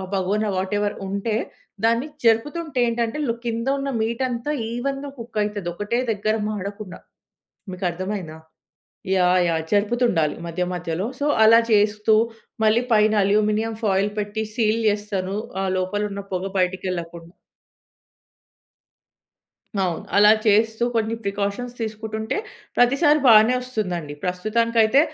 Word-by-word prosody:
బగోనా 205 +3 0
whatever 205 +2 -1
ఉంటే, 200 +3 -2 0.5
దాన్ని 230 +5 +2 0.2
జరుపుతుంటే 285 +6 +1
ఏంటంటే, 235 +3 -1
లో 230 - 0
కింద 230 +1 -2
ఉన్న 275 0 -2
మీట్ 230 +3 -1
అంతా 245 +5 -3 0.2
ఈవెన్‌గా 275 +3 -3
కుక్ 230 -2 -5
అయితది. 205 -4 -3
ఒకటే 205 +5 -1
దగ్గర 215 +1 0
మాడకుండా. 200 -1 -6 0.7
మీకు 185 +1 -3
అర్థమయిందా? 180 -2 -5 0.8
యాహ్! 180 0 +4
యాహ్! 165 -1 0
జరుపుతుండాలి 205 -6 +2
మధ్య 170 +2 -3
మధ్యలో. 175 +2 -3
సో 285 - 0 0.2
అలా 225 +1 +7
చేస్తూ, 210 +1 +3 0.5
మళ్ళీ 220 +2 +4
పైన 215 0 +4
అల్యూమినియం 215 +2 +1
ఫాయిల్ 200 0 +2
పెట్టి 210 +1 -3
సీల్ 225 -1 +1
జేస్తాను. 205 -2 -2 0.3
ఆహ్, 190 -1 -1
లోపలున్న 200 +2 -2
పొగ 185 +1 -2
బయటికెళ్ళకుండా. 180 -2 -3 2.5
అవును. 175 -3 -2
అలా 210 +1 +7 0.2
చేస్తూ 220 +2 +3
కొన్ని 225 0 0
ప్రికాషన్ 200 +4 -2
తీసుకుంటుంటే, 220 0 -3 0.4
ప్రతిసారి 285 +5 +4
బానే 225 +1 +7
వస్తుందండి. 180 -12 -4
ప్రస్తుతానికి 215 +6 0
అయితే, 220 +6 +4
210 Hz, 115 wpm, -22 LUFS, 190-230 Hz, 2.5 s, అలా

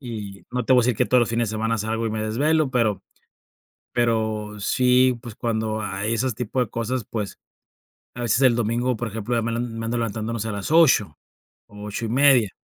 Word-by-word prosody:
y 105 -6 -7
no 125 0 -1
te - - +3
voy 125 - +6
a - - 0
decir 120 -2 +1
que - - +2
todos 125 - +4
los 120 - +1
fines 115 -1 0
de - - -7
semana 115 +1 0
salgo 110 +2 -2
y - - -2
me 110 0 -2
desvelo, 145 +7 +1
pero 110 -6 +1 0.9
pero 110 -3 -1
sí, 125 +3 +3
pues 120 -3 -8
cuando 110 -2 -2
hay 100 +1 -2
esos 120 0 -1
tipo 125 +3 -3
de 125 -4 0
cosas, 115 +2 -2
pues, 105 -3 -4 0.8
a 120 - -6
veces 120 +1 +1
el 130 -3 +5
domingo, 120 +2 0
por 120 - -3
ejemplo, 110 +3 -4
ya 115 - +1
me 115 +1 -2
le 115 - -2
me 120 - -1
ando 115 0 -4
ando 115 +2 -1
levantando 110 0 -3
no 115 - -3
sé, 110 +1 -3
a - - -2
las 100 +7 -4
8:00 135 - +4 0.5
o 105 0 -11
8:30. 120 +2 +3
115 Hz, 225 wpm, -23 LUFS, 110-125 Hz, 0.9 s, voy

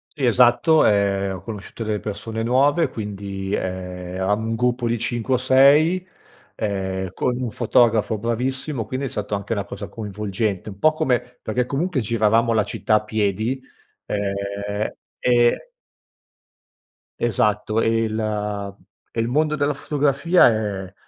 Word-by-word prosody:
Sì, 140 -4 -1
esatto, 125 +6 +5
ehm, 100 -2 +2
ho 90 - -9
conosciuto 110 +2 -7
delle 105 -1 -1
persone 110 +2 -5
nuove 140 +7 +3
quindi, 100 -2 -5
ehm, 90 -1 -4
eravamo 105 +4 0
un 115 - -1
gruppo 125 0 0
di 120 0 0
5 120 +2 -1
o - - +2
6 145 +8 +4 0.5
ehm, 95 -3 -2
con 125 +4 -1
un 125 -3 -3
fotografo 115 -2 +2
bravissimo, 125 +3 -2
quindi 130 +4 -3
è - - -3
stato 105 0 -3
anche 100 +2 -3
una 100 -2 -1
cosa 100 0 -7
coinvolgente 105 -1 -3
un 95 - -11
po' 155 - +5
come 130 -5 +1 0.2
perché 125 +3 -1
comunque 150 +2 -1
giravamo 115 +1 +2
la 110 -2 +3
città 110 +1 0
a 105 - +2
piedi, 110 +4 -1 0.4
ehm, 100 +1 -3 0.3
e 120 - +2 1.5
Esatto 110 0 +1
e 115 0 +2
il 105 -2 -3 0.4
e 115 - -4
il 115 - +1
mondo 155 +4 +1
della 145 0 +1
fotografia 145 +4 +3
è 100 -4 -3
110 Hz, 140 wpm, -22 LUFS, 100-125 Hz, 1.5 s, esatto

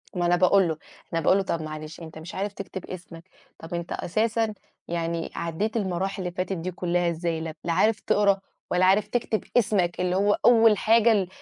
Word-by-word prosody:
ما 175 -1 0
أنا 175 0 +4
باقول 185 +1 +4
له، 160 -2 -2 0.4
أنا 165 - +1
باقول 185 - +4
له: 195 - +1
"طَب 170 -3 -2
معلش 155 0 -7
أنت 160 -1 -9
مش 160 +3 -9
عارف 200 +1 -2
تكتب 190 -2 -7
اسمك، 170 -2 -9 0.4
طَب 165 +2 -9
أنت 170 0 -4
أساسًا 220 +3 0 0.3
يعني 170 -1 -2
عدِّيت 170 +7 -2
المراحل 190 -1 -2
اللي 180 -1 -3
فاتت 185 +1 -2
دي 175 +3 -4
كُلّها 175 0 0
إزاي؟ 165 -1 -2
ل 160 -1 -5
لا 170 - 0
عارف 215 +5 +3
تقرا 200 -1 +2 0.3
ولا 180 +1 +3
عارف 195 +3 +4
تكتب 230 -3 -1
اسمك 195 -7 +1
اللي 180 0 0
هو 205 +2 +3
أول 225 -3 +6
حاجة 230 +2 +4
ال 200 -4 +2
180 Hz, 200 wpm, -25 LUFS, 170-205 Hz, 0.4 s, أول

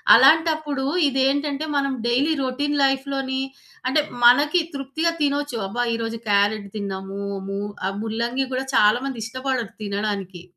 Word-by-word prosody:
అలాంటప్పుడు 310 -4 +4 0.2
ఇదేంటంటే 280 +2 0
మనం 275 -1 +1 0.2
డైలీ 275 +7 +2
రొటీన్ 285 +3 -1
లైఫ్‌లోని 270 -1 0 0.5
అంటే 300 +4 +3 0.2
మనకి 295 +8 +6
తృప్తిగా 280 +5 -1
తినొచ్చు. 285 -3 0
అబ్బా! 245 +5 -2
ఈరోజు 230 0 -4
క్యారట్ 205 0 +2
తిన్నాము 195 0 -5 0.3
ము 195 0 -3 0.3
ఆహ్, 195 - -3
ముల్లంగి 235 +4 -1
కూడా 260 +1 -1
చాలా 215 +4 +5
మంది 255 -4 -5
ఇష్టపడరు 255 -2 -3
తినడానికి. 200 -3 -3
260 Hz, 125 wpm, -23 LUFS, 215-280 Hz, 0.5 s, మనకి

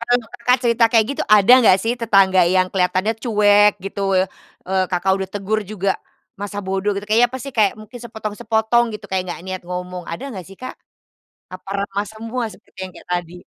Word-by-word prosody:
kalau 245 0 +1
Kakak 245 +1 +2
cerita 235 0 +3
kayak 225 -2 +4
gitu, 280 - -2
ada 210 +3 +6
enggak 215 -7 +6
sih 230 - 0
tetangga 195 -4 +4
yang 185 0 +3
kelihatannya 185 +3 +1
cuek 210 -3 +4
gitu, 195 +1 -5 0.2
e 185 - +4 0.5
eee, 190 0 +1
Kakak 185 +1 +1
udah 190 -1 -4
tegur 205 +2 -1
juga 195 -1 -2 0.5
masa 205 0 -5
bodoh 190 +2 -1
gitu, 200 - -4
kayaknya 230 +3 +5
apa 260 - -5
sih, 275 - -6
kayak 210 -3 +4
mungkin 220 +3 -11
sepotong-sepotong 220 +1 0
gitu, 210 - -9
kayak 190 -1 0
nggak 175 - -6
niat 185 -1 -5
ngomong, 180 0 -5
ada 170 - -6
enggak 190 -8 -8
sih 195 - -13
Kak? 255 - -6 0.8
Apa 185 +1 -10 0.2
ramah 200 +1 -3
semua 230 +3 -4
seperti - - -19
yang 185 - -10
kayak - - -14
tadi? 175 0 -5
205 Hz, 195 wpm, -20 LUFS, 190-225 Hz, 0.8 s, ada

